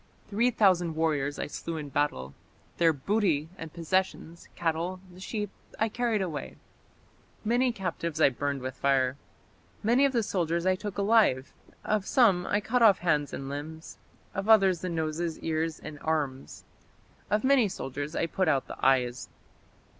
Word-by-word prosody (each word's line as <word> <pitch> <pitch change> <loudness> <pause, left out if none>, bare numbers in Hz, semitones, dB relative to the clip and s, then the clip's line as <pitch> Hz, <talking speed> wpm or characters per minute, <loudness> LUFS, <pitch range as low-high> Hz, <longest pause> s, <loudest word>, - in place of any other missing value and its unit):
Three 230 +5 +3
thousand 185 -8 +3
warriors 145 -3 0
I - - -2
slew 165 +2 -5
in 150 -2 -6
battle. 125 - -1 0.4
Their 165 -1 +5
booty 160 0 0
and 165 -4 -8
possessions, 170 0 -2
cattle, 170 +3 -1 0.2
sheep, 210 +1 -4 0.3
I 220 - +1
carried 230 -3 0
away; 160 -5 -5 0.9
many 245 +3 +2
captives 170 -6 -4
I 155 - +6
burned 140 0 -3
with 130 0 -3
fire. 130 -1 +1 0.7
Many 240 +6 +4
of 275 - +2
their 235 -2 +2
soldiers 170 -3 -1
I 185 - +4
took 205 +1 -6
alive; 200 - +3 0.3
of 210 -2 0
some 195 -9 +4
I 205 - +2
cut 245 +4 0
off 210 -5 +7
hands 150 -4 0
and 135 - -5
limbs; 155 +3 -7 0.3
of 195 +3 -3
others 195 -5 +5
the 185 - -3
noses, 160 0 -2
ears, 160 0 -1
and 150 -1 -9
arms; 145 -4 -2 0.7
of 210 +2 +1
many 260 -4 +4
soldiers 145 -3 -5
I - - +1
put 185 +3 -1
out 135 - +2
the - - -10
eyes. 125 -2 +2
170 Hz, 155 wpm, -28 LUFS, 145-205 Hz, 0.9 s, off